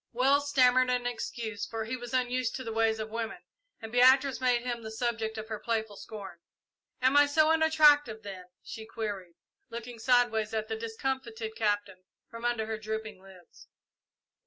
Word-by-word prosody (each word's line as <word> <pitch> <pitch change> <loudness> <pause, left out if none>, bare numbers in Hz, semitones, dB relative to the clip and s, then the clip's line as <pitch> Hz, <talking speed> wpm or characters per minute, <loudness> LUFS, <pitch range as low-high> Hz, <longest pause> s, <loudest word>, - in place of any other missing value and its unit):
Wells 280 +4 +3
stammered 255 -2 +4
an 250 -1 0
excuse, 230 -2 -4
for 225 -1 -4
he 230 +3 -3
was 245 -1 -8
unused 250 -2 0
to 260 - -5
the 225 -2 -5
ways 225 0 +2
of 220 0 -5
women, 230 0 -4 0.4
and 220 - -7
Beatrice 260 +2 +5
made 245 -2 +2
him 240 -2 -3
the 220 - -7
subject 225 -1 -2
of 220 0 -6
her 215 -2 -4
playful 220 -2 -2
scorn. 200 -5 -9 0.6
"Am 260 +2 +4
I 290 0 +7
so 310 +2 +4
unattractive, 300 -7 +4
then?" 190 -3 -8 0.2
she 220 -1 -8
queried, 205 -6 -5 0.3
looking 235 0 -7
sideways 225 -3 +2
at 220 0 -2
the 220 - -1
discomfited 225 -1 -4
Captain 205 -4 -1 0.3
from 230 +1 -7
under 240 -2 0
her 220 0 -4
drooping 220 -2 -5
lids. 190 -3 -17
230 Hz, 170 wpm, -29 LUFS, 220-250 Hz, 0.6 s, I